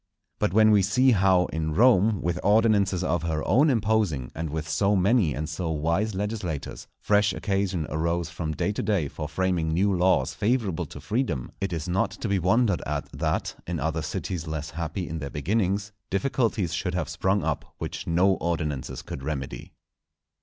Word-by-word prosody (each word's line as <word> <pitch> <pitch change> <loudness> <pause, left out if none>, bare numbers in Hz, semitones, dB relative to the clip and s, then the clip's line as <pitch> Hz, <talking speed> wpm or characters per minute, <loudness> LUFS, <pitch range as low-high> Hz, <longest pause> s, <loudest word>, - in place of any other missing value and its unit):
But - - +1
when 110 +2 +5
we 105 -2 +5
see 125 +7 +3
how 95 -4 +4
in 80 -1 -2
Rome, 110 -3 +4
with 85 +1 -1
ordinances 100 -3 +3
of 85 -2 0
her 80 -2 -2
own 135 +10 +4
imposing, 110 - +1
and 80 0 -4
with 80 +2 -4
so 100 +5 +2
many 95 - +3
and 75 +2 -3
so 80 +2 -3
wise 85 +7 0
legislators, 100 -7 -4
fresh 105 -1 +2
occasion 95 -4 -1
arose 85 +2 -1
from 80 -2 -3
day 90 - -1
to 105 - -3
day 95 -9 0
for 75 +2 -6
framing 90 -1 0
new 95 +4 +2
laws 90 +1 +2
favourable 105 -6 0
to - - -10
freedom, 105 - -2
it 95 -1 -1
is 80 -1 -3
not 90 +2 +1
to - - -6
be 100 -2 +1
wondered 100 +2 +2
at 75 -1 -3
that, - - -1
in 85 -2 -2
other 80 +2 -1
cities 85 +2 -4
less 75 -2 -4
happy 85 +3 -4
in 80 - -4
their 70 -2 -5
beginnings, 100 +6 -1 0.2
difficulties 105 -5 0
should 90 +1 -2
have 90 - -1
sprung 95 +2 0
up - - -3
which - - -5
no 95 +3 +3
ordinances 75 -5 -3
could 65 - -7
remedy. 70 -4 -5
90 Hz, 180 wpm, -26 LUFS, 80-105 Hz, 0.2 s, when